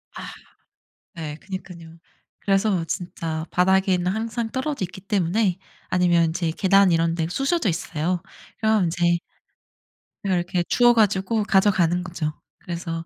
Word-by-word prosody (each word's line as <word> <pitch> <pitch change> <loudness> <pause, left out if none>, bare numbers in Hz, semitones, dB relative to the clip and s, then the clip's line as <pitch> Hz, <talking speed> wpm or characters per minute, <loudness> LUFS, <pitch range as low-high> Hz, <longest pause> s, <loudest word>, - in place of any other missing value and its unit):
아. - - -7 0.9
네 155 -3 -6
그니깐요. 170 -3 -9 0.4
그래서 195 -3 +1
진짜 165 -2 -4
바닥에는 185 0 +2
항상 225 +2 -3
떨어져 260 -4 -2
있기 180 +2 -8
때문에 195 0 +1 0.3
아니면 175 -2 +3
제 170 -1 -1
계단 195 +2 +4
이런 165 0 +2
데 165 -1 -1
쑤셔져 270 - 0
있어요. 170 +1 -2 0.4
그럼 220 -3 +2
인제 170 0 +1 1.1
그럼 190 -3 +1
이렇게 175 0 -1
주워 240 -1 +5
가지고 210 0 +2
가져가는 185 -4 +2
거죠. 170 -4 -3 0.3
그래서 170 -1 -5
180 Hz, 290 characters per minute, -23 LUFS, 170-200 Hz, 1.1 s, 주워